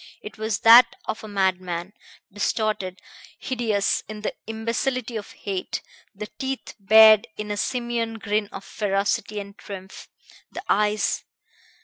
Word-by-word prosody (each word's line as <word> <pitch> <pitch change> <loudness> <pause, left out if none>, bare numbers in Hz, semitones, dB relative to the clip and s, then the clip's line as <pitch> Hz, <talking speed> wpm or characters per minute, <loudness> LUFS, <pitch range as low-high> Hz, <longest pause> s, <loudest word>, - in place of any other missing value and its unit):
It 210 0 -10
was 220 -1 -2
that 230 +2 +8
of 215 - -4
a - - -7
madman, 185 -2 -1 0.4
distorted, 205 -2 -1 0.4
hideous 225 -6 0
in 215 -1 -8
the 210 - -2
imbecility 230 +2 -2
of 210 -2 -6
hate, 190 -2 -4 0.3
the 210 +2 -5
teeth 265 0 -4
bared 215 +1 +7
in 210 0 -4
a 205 - -2
simian 235 -1 -2
grin 210 -1 -1
of 195 - -8
ferocity 205 +1 -1
and 200 0 -9
triumph, 190 -2 -10 0.4
the 360 - -7
eyes 210 0 +1
210 Hz, 130 wpm, -24 LUFS, 200-225 Hz, 0.4 s, that